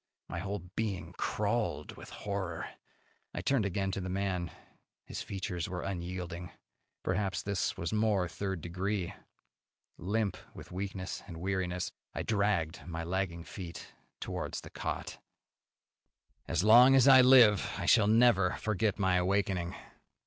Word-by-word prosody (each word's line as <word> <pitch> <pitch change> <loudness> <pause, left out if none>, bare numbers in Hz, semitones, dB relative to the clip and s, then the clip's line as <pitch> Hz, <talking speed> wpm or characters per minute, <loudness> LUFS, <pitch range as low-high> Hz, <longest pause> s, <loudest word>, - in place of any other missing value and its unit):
My 85 - -4
whole 100 0 -4
being 105 -5 -3
crawled 105 -6 -1
with - - -11
horror. 95 -5 -4 0.7
I - - -2
turned 130 -7 +2
again 95 +1 -1
to 95 - -3
the 90 - -4
man. 90 -2 -1 0.6
His - - -6
features 90 -2 -4
were 90 -1 -4
unyielding. 90 -1 -5 0.5
Perhaps 95 -1 -1
this 100 -2 -1
was 85 +5 -3
more 105 -4 +2
third 95 -1 -4
degree. 90 +2 -2 0.9
Limp 105 +3 -1 0.2
with - - -11
weakness 95 0 -4
and 85 -4 -8
weariness, 90 0 -2 0.2
I - - -2
dragged 100 -7 0
my 80 -1 -4
lagging 85 -1 -2
feet 85 +1 -8 0.3
towards - - -4
the - - -12
cot. - - -4 1.3
As 85 +4 0
long 120 +5 +8
as 135 0 +6
I 130 -1 +9
live 125 -6 +6
I - - -3
shall 110 -3 +5
never 110 -5 +5
forget 110 -1 0
my 95 -2 +2
awakening. 95 -1 0
95 Hz, 135 wpm, -31 LUFS, 90-105 Hz, 1.3 s, I